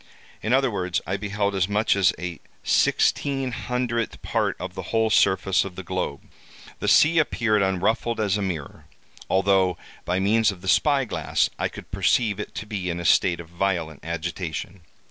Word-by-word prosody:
In 110 - -2
other 135 -1 +3
words, 90 -3 -1
I 95 - -2
beheld 100 0 -2
as 95 0 0
much 105 +1 +2
as 95 -3 +4
a 90 -2 -5 0.2
sixteen 135 -2 +1
hundredth 120 -1 -2
part - - 0
of 95 -1 -6
the - - -5
whole 110 -1 +1
surface 95 -1 +3
of 95 -2 -8
the 95 - -7
globe. 90 -5 -3 0.6
The - - -3
sea 165 +2 +5
appeared 115 -8 +1
unruffled 105 +5 0
as 100 -3 +1
a 105 - -1
mirror, 85 -7 -5 0.4
although, 95 -2 +2 0.3
by 90 +1 -1
means 110 +3 +3
of 95 -3 -11
the 95 - -9
spy 140 +6 +3
glass, - - 0
I - - +1
could - - -11
perceive 100 +3 +1
it 105 - -6
to - - -5
be 100 -4 -4
in 85 0 -3
a 85 - -5
state 85 +1 +3
of 85 -1 -10
violent 85 -4 -2
agitation. 85 +2 -5
95 Hz, 180 wpm, -24 LUFS, 90-110 Hz, 0.6 s, sea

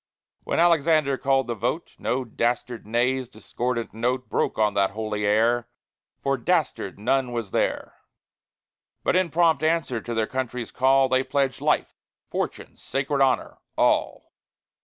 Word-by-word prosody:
When - - 0
Alexander 160 -4 +3
called 135 0 +1
the 120 - -2
vote, 125 +9 -3
No 130 +1 -1
dastard 120 0 -2
"nay's" 125 +2 0
discordant 120 -2 -4
note 125 +3 -1
Broke - - 0
on 105 -1 +2
that 100 -1 +2
holy 105 -1 -2
air 115 +3 +2 0.6
For 135 0 +1
dastard 155 - -1
none 125 +4 0
was 115 -5 -4
there! - - -1 1.1
But - - +1
in 185 -1 +2
prompt 165 -2 +3
answer 155 -7 0
to 120 +1 -5
their 110 -1 +1
country's 125 -1 -4
call, 135 +1 +4
They 130 0 +2
pledged 135 0 -1
life, - - +1 0.4
fortune, - - -4
sacred 140 +1 -2
honor 135 -1 +1 0.2
all! - - +1
130 Hz, 140 wpm, -25 LUFS, 115-140 Hz, 1.1 s, call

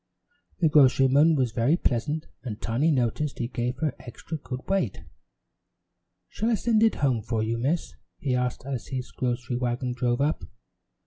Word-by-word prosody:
The 165 - +5
grocerman 140 +1 +5
was 130 -5 +1
very 120 +8 +2
pleasant 145 +3 -1 0.2
and 115 -5 -6
Tiny 125 +8 +1
noticed 135 +1 0
he 120 - -2
gave 120 0 -2
her 150 -1 -1
extra 130 +6 -8
good 130 -2 -7
weight. 195 0 -1 1.2
"Shall 225 - -2
I 235 - +3
send 220 +1 +2
it 225 0 +4
home 125 -5 +2
for 110 0 -1
you, 115 +1 -1
Miss?" 150 +8 -1 0.2
he 140 -6 -1
asked 125 0 -1
as 135 -4 -4
his 125 -4 -5
grocery 120 -1 -2
wagon 125 +1 -1
drove 120 0 0
up. 150 +2 +1
130 Hz, 165 wpm, -26 LUFS, 120-150 Hz, 1.2 s, The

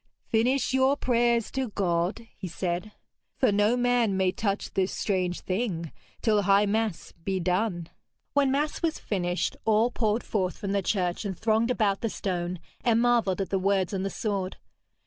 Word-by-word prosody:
'Finish 250 +4 +2
your 265 +2 +3
prayers 235 -3 +2
to 265 -1 -1
God,' 185 +2 -1
he 190 - -6
said, 180 +4 -3 0.5
'for 255 -6 +3
no 205 +4 +3
man 245 -5 +2
may 190 -1 +2
touch 205 -2 -2
this 190 0 +1
strange 185 -3 -1
thing 185 -5 -2 0.3
till 215 -2 +3
high 200 +1 +4
mass 215 -3 -1
be 190 0 -1
done.' 180 -1 0 0.5
When 285 -1 +3
mass 290 +3 0
was 330 -1 0
finished, 180 -3 -2
all 220 +2 +3
poured 220 -1 0
forth 185 -4 -1
from 200 -3 -4
the 200 0 +1
church 180 -1 -1
and 195 -4 -4
thronged 220 +1 +2
about 210 -5 +1
the 230 - 0
stone, 180 -3 -3 0.3
and 230 -2 +3
marvelled 235 -6 +2
at 195 - -4
the 195 - +2
words 195 0 +1
on 190 - -1
the 195 - -1
sword. 195 -3 -3
205 Hz, 170 wpm, -27 LUFS, 185-235 Hz, 0.5 s, high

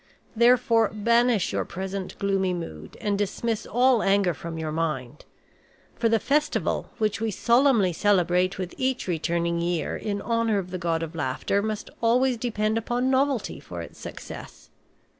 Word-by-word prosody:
Therefore, 235 -1 +4
banish 235 0 +2
your - - 0
present 190 +1 -5
gloomy 195 -2 0
mood 80 - -8
and 205 -1 -1
dismiss 215 +2 -2
all 245 0 +3
anger 195 -2 +3
from 165 +1 -7
your 160 -1 -3
mind. 150 -4 -3 0.7
For 230 - +1
the 225 - +4
festival, 295 +7 0
which 215 -1 0
we 225 - 0
solemnly 235 -3 +3
celebrate 185 -1 +2
with 185 -2 -4
each 260 -4 -1
returning 170 0 0
year 170 -1 -1
in 205 -1 -3
honor 230 -1 +1
of 185 -2 -4
the 185 - -4
God 165 -2 0
of 165 0 -6
Laughter, 155 +6 -1
must 215 0 -4
always 245 +2 +3
depend 220 -1 0
upon 245 +3 0
novelty 265 - 0
for 90 -11 -7
its - - -12
success. - - -9
205 Hz, 155 wpm, -25 LUFS, 175-235 Hz, 0.7 s, Therefore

